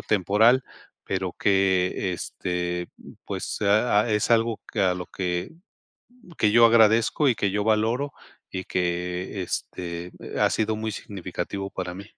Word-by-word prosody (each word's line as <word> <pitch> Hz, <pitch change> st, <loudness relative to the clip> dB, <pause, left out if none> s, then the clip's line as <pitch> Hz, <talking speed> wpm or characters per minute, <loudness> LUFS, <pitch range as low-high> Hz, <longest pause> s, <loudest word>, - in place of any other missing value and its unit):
temporal, 110 Hz, +6 st, +3 dB, 0.4 s
pero 95 Hz, -2 st, -3 dB
que, 95 Hz, -1 st, +2 dB
este, 90 Hz, 0 st, -3 dB, 0.4 s
pues, -, -, -4 dB
ah 105 Hz, +1 st, +3 dB
ah, -, -, -4 dB
es 105 Hz, +1 st, +1 dB
algo 115 Hz, -1 st, +2 dB
que -, -, -1 dB
a 95 Hz, -2 st, +3 dB
lo 90 Hz, 0 st, -5 dB
que 90 Hz, -1 st, -3 dB, 0.9 s
que 105 Hz, -, +3 dB
yo 115 Hz, +1 st, +8 dB
agradezco 115 Hz, +5 st, +4 dB
y 125 Hz, -, +3 dB
que 100 Hz, -, 0 dB
yo 105 Hz, +1 st, -1 dB
valoro 115 Hz, +6 st, +1 dB, 0.4 s
y 95 Hz, -, -4 dB
que 90 Hz, +2 st, -2 dB
este, 90 Hz, 0 st, -5 dB, 0.3 s
ha -, -, +3 dB
sido 110 Hz, 0 st, 0 dB
muy 110 Hz, 0 st, -3 dB
significativo 95 Hz, 0 st, -5 dB
para 90 Hz, -2 st, -5 dB
mí. 100 Hz, +2 st, -8 dB
100 Hz, 145 wpm, -25 LUFS, 90-110 Hz, 0.9 s, yo